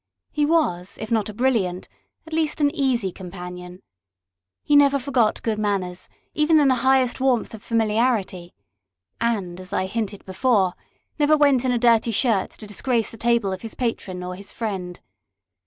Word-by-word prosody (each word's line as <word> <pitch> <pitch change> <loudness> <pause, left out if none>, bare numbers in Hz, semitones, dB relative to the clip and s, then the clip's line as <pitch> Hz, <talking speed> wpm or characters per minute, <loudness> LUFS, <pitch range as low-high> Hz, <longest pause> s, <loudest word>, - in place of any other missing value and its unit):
He 295 -1 +1
was, 200 - 0
if 220 +1 -6
not 220 -2 +1
a - - -7
brilliant, 210 -8 0 0.4
at 320 - -11
least 315 -1 0
an 290 -1 +2
easy 250 -9 0
companion. 180 0 -9 0.8
He 295 - +2
never 280 -1 +5
forgot 255 -5 0
good 220 -2 -1
manners, 190 -4 -2 0.2
even 310 +1 +4
in 285 -2 +4
the - - +5
highest 260 -1 +3
warmth 255 -5 +1
of 220 - -9
familiarity, 220 -5 0 0.6
and, 200 -7 -1
as 185 0 -10
I 185 - 0
hinted 205 0 -4
before, 190 -1 +1 0.5
never 300 +1 +4
went 280 -4 +3
in 255 - +2
a 245 - +1
dirty 235 -1 +3
shirt 225 -3 +1
to 215 - -11
disgrace 225 +3 -1
the - - -11
table 230 -4 +1
of 185 - -6
his 225 - -8
patron 195 -7 -3
or 180 0 -5
his 195 +2 -9
friend. 190 -6 -5
225 Hz, 170 wpm, -23 LUFS, 190-260 Hz, 0.8 s, never